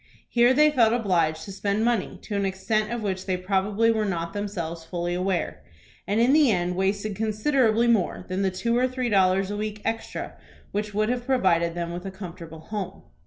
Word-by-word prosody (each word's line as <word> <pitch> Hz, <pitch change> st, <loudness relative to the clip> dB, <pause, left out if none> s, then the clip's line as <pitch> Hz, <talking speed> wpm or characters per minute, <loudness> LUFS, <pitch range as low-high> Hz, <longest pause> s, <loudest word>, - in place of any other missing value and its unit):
Here 240 Hz, +1 st, +4 dB
they 300 Hz, +3 st, +5 dB
felt 230 Hz, -5 st, +4 dB
obliged 170 Hz, -9 st, +1 dB
to 200 Hz, -, -8 dB
spend 200 Hz, +3 st, -1 dB
money 235 Hz, -5 st, 0 dB
to 210 Hz, -, -5 dB
an 200 Hz, -, 0 dB
extent 215 Hz, +3 st, -1 dB
of 240 Hz, -2 st, -3 dB
which 190 Hz, -2 st, -3 dB
they 185 Hz, -1 st, 0 dB
probably 200 Hz, +4 st, +1 dB
were 220 Hz, -1 st, 0 dB
not 170 Hz, -3 st, -2 dB
themselves 175 Hz, -5 st, -4 dB
fully 175 Hz, +1 st, -3 dB
aware; 180 Hz, 0 st, -1 dB, 0.5 s
and 205 Hz, +3 st, +1 dB
in 245 Hz, +4 st, +4 dB
the 300 Hz, -3 st, +5 dB
end 180 Hz, -2 st, 0 dB
wasted 200 Hz, +2 st, -1 dB
considerably 220 Hz, +2 st, +2 dB
more 220 Hz, -6 st, +1 dB
than 185 Hz, +1 st, -2 dB
the 195 Hz, -, +2 dB
two 230 Hz, +6 st, -1 dB
or 250 Hz, +1 st, +3 dB
three 255 Hz, -1 st, -2 dB
dollars 190 Hz, -1 st, +3 dB
a 205 Hz, -, -3 dB
week 210 Hz, 0 st, -4 dB
extra 225 Hz, 0 st, -3 dB, 0.4 s
which 210 Hz, 0 st, -3 dB
would 215 Hz, +1 st, +1 dB
have 245 Hz, 0 st, -2 dB
provided 170 Hz, -10 st, +2 dB
them 170 Hz, 0 st, -3 dB
with 180 Hz, +2 st, -6 dB
a -, -, -3 dB
comfortable 170 Hz, -4 st, -9 dB
home. 195 Hz, 0 st, -6 dB
200 Hz, 200 wpm, -25 LUFS, 185-225 Hz, 0.5 s, they